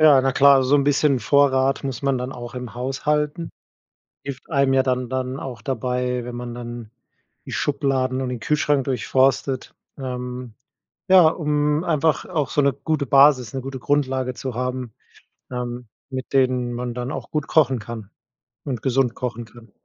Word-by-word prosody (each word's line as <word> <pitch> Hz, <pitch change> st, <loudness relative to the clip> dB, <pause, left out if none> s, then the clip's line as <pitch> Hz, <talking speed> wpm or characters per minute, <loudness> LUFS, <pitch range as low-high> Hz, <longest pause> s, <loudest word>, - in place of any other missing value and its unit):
Ja, 150 Hz, -4 st, +7 dB
na 135 Hz, 0 st, +1 dB
klar, 135 Hz, 0 st, +6 dB
so 135 Hz, +3 st, +3 dB
'n 140 Hz, -, +2 dB
bisschen 145 Hz, -1 st, +3 dB
Vorrat 135 Hz, +2 st, +3 dB
muss 135 Hz, -4 st, -4 dB
man 140 Hz, -1 st, +1 dB
dann 125 Hz, +1 st, -4 dB
auch 120 Hz, 0 st, -8 dB
im 125 Hz, -3 st, -7 dB
Haus 130 Hz, +2 st, -4 dB
halten. 150 Hz, +2 st, 0 dB, 0.7 s
Hilft 140 Hz, +2 st, -7 dB
einem 140 Hz, -3 st, +2 dB
ja 135 Hz, -, +5 dB
dann 125 Hz, -1 st, -1 dB
dann 130 Hz, 0 st, -2 dB
auch 125 Hz, -3 st, -7 dB
dabei, 125 Hz, -1 st, -2 dB
wenn 120 Hz, 0 st, -6 dB
man 120 Hz, -1 st, -6 dB
dann 120 Hz, -2 st, -7 dB, 0.5 s
die -, -, -8 dB
Schubladen 135 Hz, -3 st, 0 dB
und 130 Hz, -, -2 dB
den 125 Hz, -, -4 dB
Kühlschrank 145 Hz, +1 st, +1 dB
durchforstet. 130 Hz, 0 st, 0 dB, 0.2 s
Ähm, 125 Hz, -2 st, -5 dB, 0.6 s
ja, 185 Hz, -4 st, +8 dB
um 150 Hz, 0 st, 0 dB
einfach 160 Hz, -2 st, +1 dB
auch 155 Hz, -7 st, -2 dB
so 145 Hz, -, +2 dB
'ne 140 Hz, -1 st, +3 dB
gute 155 Hz, -4 st, -2 dB
Basis, 135 Hz, -3 st, +5 dB
'ne 135 Hz, -, -2 dB
gute 135 Hz, 0 st, -6 dB
Grundlage 130 Hz, -2 st, 0 dB
zu 130 Hz, 0 st, -5 dB
haben, 125 Hz, -1 st, -3 dB, 0.6 s
ähm, 125 Hz, -1 st, -5 dB, 0.2 s
mit 130 Hz, -1 st, -6 dB
denen 125 Hz, -2 st, +2 dB
man 120 Hz, 0 st, -4 dB
dann 125 Hz, +3 st, -4 dB
auch -, -, -6 dB
gut 150 Hz, -2 st, -2 dB
kochen 135 Hz, -5 st, +3 dB
kann 110 Hz, -2 st, -8 dB, 0.6 s
und 130 Hz, -6 st, -3 dB
gesund 130 Hz, -2 st, +1 dB
kochen 120 Hz, -2 st, -4 dB
kann. 115 Hz, -1 st, -17 dB
130 Hz, 170 wpm, -22 LUFS, 125-140 Hz, 0.7 s, ja